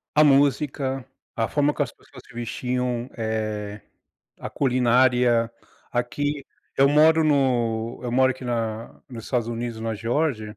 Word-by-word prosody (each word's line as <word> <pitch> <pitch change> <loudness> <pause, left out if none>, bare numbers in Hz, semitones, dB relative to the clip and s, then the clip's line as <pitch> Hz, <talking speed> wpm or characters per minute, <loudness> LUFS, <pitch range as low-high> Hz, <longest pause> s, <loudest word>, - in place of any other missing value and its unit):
a 155 - +6
música, 135 -1 +2 0.3
a 115 -1 0
forma 145 0 +1
que 145 - 0
as - - -4
pessoas 130 -4 -16
se 130 - -17
vestiam, 125 +1 -2
eh, 110 -2 -3 0.6
a - - -6
culinária, 125 -2 +2 0.4
aqui 140 +4 -2 0.3
eu 135 +1 +5
moro 160 +2 +5
no 120 -6 +1
eu 120 -1 -4
moro 130 +1 +4
aqui 130 0 -11
na 115 -2 -4
nos 115 -4 -9
Estados 120 -3 -1
Unidos, 115 -1 -4
na 115 0 -2
Geórgia. 115 -1 -2
125 Hz, 140 wpm, -24 LUFS, 115-135 Hz, 0.6 s, a